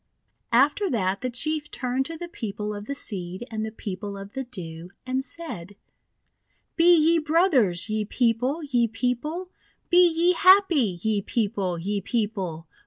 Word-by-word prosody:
After 290 - +3
that 195 - 0
the 255 - -1
Chief 300 +5 -1
turned 260 +1 -2
to 330 - -6
the 345 - -6
People 210 -8 -5
of 205 0 -7
the 280 - -3
Seed 185 -4 -5
and 220 -1 -3
the 220 - -4
People 200 -1 -6
of 195 +1 -9
the 265 - -3
Dew, 170 -7 -8 0.2
and 260 +1 -1
said: 205 - -7 0.5
— - - -46
"Be 345 +1 +5
ye 325 +2 +4
brothers, 300 - +2
ye 215 -1 -1
People! 250 +7 0
ye 245 -5 +1
People! 250 - -3 0.4
Be 355 0 +7
ye 340 +2 +3
happy, 345 - +5
ye 215 -2 +1
People! 200 -5 -1
ye 200 +4 -2
People! 195 -7 -2
235 Hz, 160 wpm, -25 LUFS, 200-310 Hz, 0.5 s, Be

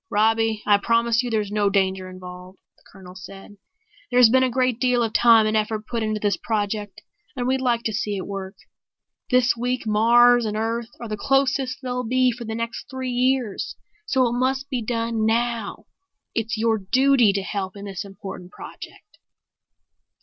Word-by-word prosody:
"Robbie, 220 0 +1
I 205 -1 +5
promise 230 +1 +2
you 245 - -4
there's 210 -3 -1
no 210 -1 +1
danger 190 -1 0
involved," 180 0 -11 0.2
the - - -30
Colonel 180 -2 -13
said. 195 +2 -12 0.5
"There's 245 -2 +6
been 260 +1 +4
a 260 - +2
great 255 -1 0
deal 250 -2 +2
of 225 -1 -2
time 230 -2 +6
and 215 0 0
effort 215 0 -1
put 235 0 -3
into 215 -1 -1
this 205 -1 0
project 210 -2 -3 0.3
and 245 -2 -3
we'd 260 +1 0
like 240 -2 0
to 220 - -2
see 205 -1 -2
it 190 - -5
work. 195 0 -6 0.7
This 250 -1 +3
week 245 +1 -2
Mars 240 +3 +5
and 215 -1 -2
Earth 225 +1 -2
are 235 - -6
the 215 -1 -4
closest 270 +1 0
they'll 250 -1 -2
be 255 +2 +2
for 235 0 -8
the 220 0 -4
next 230 +3 -5
three 260 -2 -4
years, 250 -3 -1 0.3
so 260 - +2
it 235 - -2
must 265 +2 -1
be 250 -2 -1
done 230 -1 -2
now. 230 -1 -1 0.5
It's 225 0 -2
your 225 0 +1
duty 255 +2 +3
to 195 -1 -2
help 190 -1 -4
in 200 0 -9
this 195 0 -5
important 195 -2 -9
project." - - -12
225 Hz, 180 wpm, -23 LUFS, 205-245 Hz, 0.7 s, There's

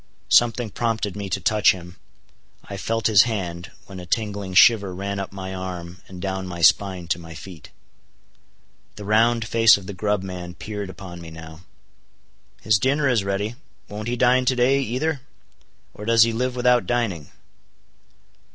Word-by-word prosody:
Something 120 -2 +3
prompted 110 -4 -2
me 100 -1 -5
to 95 - -1
touch 105 +2 +3
him. 90 -1 -11 0.7
I 100 - -8
felt 115 +3 -3
his 105 -3 +6
hand, 90 -5 -4 0.2
when 95 -2 -10
a 90 - -9
tingling 100 -2 -3
shiver 100 0 +5
ran 100 +1 -4
up 100 - -5
my 95 -1 -7
arm 90 -1 -7
and 90 -1 -10
down 95 0 -4
my 85 -1 -7
spine 90 +1 +3
to 85 - 0
my 80 -1 -11
feet. 85 -2 -11 1.3
The 105 - -9
round 115 +2 +2
face 115 -2 +5
of 100 - -11
the 100 - -6
grub 105 0 -1
man 90 -2 -7
peered 105 -2 -6
upon 90 -2 -10
me 85 - -9
now. 80 0 -11 1.0
"His 105 -1 +3
dinner 140 +4 +1
is 120 -6 +2
ready. 100 +3 -2 0.4
Won't 105 +1 -6
he 120 - -1
dine 125 +1 +3
to 130 - +2
day, 130 +3 +3
either? 135 +4 -2 0.7
Or 105 - -9
does 115 0 +5
he 115 0 0
live 125 +2 -2
without 125 -1 +2
dining?" 105 -11 -2
100 Hz, 170 wpm, -23 LUFS, 90-115 Hz, 1.3 s, his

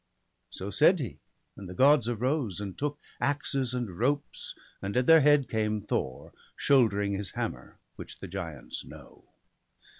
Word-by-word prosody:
So 100 +2 -6
said 165 - +5
he; 135 -8 -5 0.4
and 95 -3 -9
the 90 - -8
Gods 135 -2 +5
arose, 120 - -1
and 100 -3 -5
took 145 0 -2 0.2
Axes 140 -3 -1
and 110 -8 -4
ropes, 140 +4 -1 0.3
and 100 +4 -3
at 125 - +3
their 165 +1 +8
head 145 -1 +5
came 110 -1 0
Thor, 65 -10 -3 0.2
Shouldering 105 -7 +3
his 100 -1 -4
hammer, - - -5 0.2
which - - -9
the - - -8
giants 85 -4 -6
know. - - -14
120 Hz, 150 wpm, -29 LUFS, 100-140 Hz, 0.4 s, their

